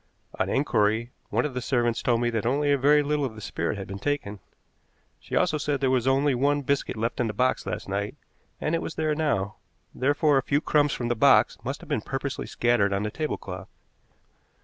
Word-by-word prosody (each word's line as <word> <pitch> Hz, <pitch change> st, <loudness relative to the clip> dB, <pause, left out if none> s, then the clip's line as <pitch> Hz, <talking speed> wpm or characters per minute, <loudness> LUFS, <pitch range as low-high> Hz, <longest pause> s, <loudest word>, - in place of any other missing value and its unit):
On -, -, +1 dB
inquiry, 110 Hz, +3 st, +1 dB, 0.2 s
one 115 Hz, +5 st, +1 dB
of 145 Hz, -, -3 dB
the 125 Hz, -, -3 dB
servants 120 Hz, -2 st, 0 dB
told 120 Hz, -1 st, +1 dB
me 120 Hz, 0 st, +1 dB
that 115 Hz, -2 st, -1 dB
only 145 Hz, +5 st, +1 dB
a -, -, +5 dB
very 145 Hz, +2 st, +5 dB
little 150 Hz, 0 st, 0 dB
of 125 Hz, -5 st, -3 dB
the -, -, -9 dB
spirit 105 Hz, 0 st, -3 dB
had 95 Hz, -, -6 dB
been 100 Hz, +1 st, -6 dB
taken. 125 Hz, -7 st, -2 dB, 0.8 s
She -, -, -6 dB
also 155 Hz, -, +2 dB
said 145 Hz, -1 st, -1 dB
there 135 Hz, -1 st, +1 dB
was 130 Hz, -1 st, +1 dB
only 135 Hz, +1 st, +3 dB
one 140 Hz, +3 st, +1 dB
biscuit 140 Hz, -3 st, -1 dB
left 115 Hz, +2 st, -2 dB
in 120 Hz, -, +1 dB
the 105 Hz, -, -3 dB
box 130 Hz, +3 st, 0 dB
last -, -, -4 dB
night, 100 Hz, +5 st, -2 dB, 0.4 s
and 155 Hz, -, -1 dB
it 165 Hz, -, +1 dB
was 160 Hz, -, -5 dB
there 155 Hz, -1 st, 0 dB
now; 120 Hz, -10 st, -1 dB, 0.4 s
therefore 145 Hz, +1 st, +2 dB
a -, -, -1 dB
few 140 Hz, +2 st, +1 dB
crumbs 145 Hz, -2 st, +2 dB
from 120 Hz, -1 st, -3 dB
the 120 Hz, -, +1 dB
box -, -, +4 dB
must -, -, -4 dB
have -, -, -12 dB
been -, -, -1 dB
purposely -, -, -4 dB
scattered 120 Hz, -4 st, +2 dB
on 100 Hz, +1 st, 0 dB
the 105 Hz, -, -2 dB
tablecloth. 155 Hz, +5 st, -5 dB
130 Hz, 215 wpm, -26 LUFS, 110-145 Hz, 0.8 s, a